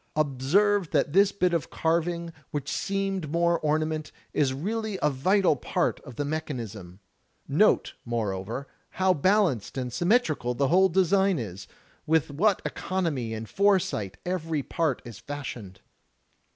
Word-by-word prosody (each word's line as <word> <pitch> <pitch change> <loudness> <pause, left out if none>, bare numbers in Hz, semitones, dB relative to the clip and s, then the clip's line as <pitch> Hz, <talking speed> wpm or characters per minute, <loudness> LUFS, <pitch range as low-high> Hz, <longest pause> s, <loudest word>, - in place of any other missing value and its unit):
Observe 155 +7 +2
that 145 -1 +1
this 200 +2 +5
bit 180 -3 +1
of 165 -5 -1
carving, 170 +1 -1 0.2
which 145 -2 -4
seemed 195 -5 -2
mere 170 +1 +2
orna 155 0 +1
ment, 155 -1 -4 0.2
is 140 -3 +2
really 210 +8 -3
a 150 - +2
vital 185 +6 +3
part 125 - -1
of 125 - -12
the 145 - -2
mechanism. 115 - -5 0.5
Note, - - +3
more 115 -4 -1
over, 105 +9 -5 0.3
how 190 0 +4
balanced 180 - +1
and 125 -2 -3
symmetrical 175 - +1
the 140 +1 +1
whole 190 +2 +5
design 190 +1 +3
is, 100 -6 -6 0.4
with 160 -2 +2
what 190 +7 +2
economy 160 -11 -2
and 110 0 -6
foresight 185 - +1
every 165 -5 -2
part 160 -4 -1
is 120 -4 -9
fashioned. 120 -10 -7
155 Hz, 140 wpm, -27 LUFS, 130-185 Hz, 0.5 s, this